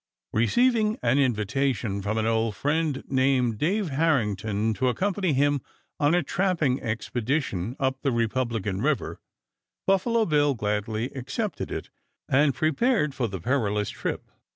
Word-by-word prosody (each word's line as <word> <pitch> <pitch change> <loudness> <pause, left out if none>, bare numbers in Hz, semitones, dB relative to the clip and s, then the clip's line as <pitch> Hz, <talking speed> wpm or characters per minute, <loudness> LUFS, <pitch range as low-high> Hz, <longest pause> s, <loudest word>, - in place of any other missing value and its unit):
Receiving 220 - +2
an 125 +4 +3
invitation 120 -3 0
from 105 +3 -2
an 110 - +1
old 115 -1 +1
friend 150 +1 0
named 130 -4 +2
Dave 195 +3 0
Harrington 110 - +1
to 120 +6 0
accompany 185 - 0
him 145 0 +2 0.4
on 145 +3 +3
a 175 - +2
trapping 165 -6 0
expedition 115 - -2
up 130 0 -1
the 135 - +1
Republican 115 -4 -1
River, 150 +1 -1 0.7
Buffalo 220 +4 +2
Bill 145 -4 +2
gladly 110 +3 -2
accepted 140 - -4
it, - - -5 0.4
and 140 0 +3
prepared 155 - +1
for 125 -3 -1
the 95 -3 -5
perilous 105 -1 0
trip. - - -4
130 Hz, 130 wpm, -26 LUFS, 110-155 Hz, 0.7 s, an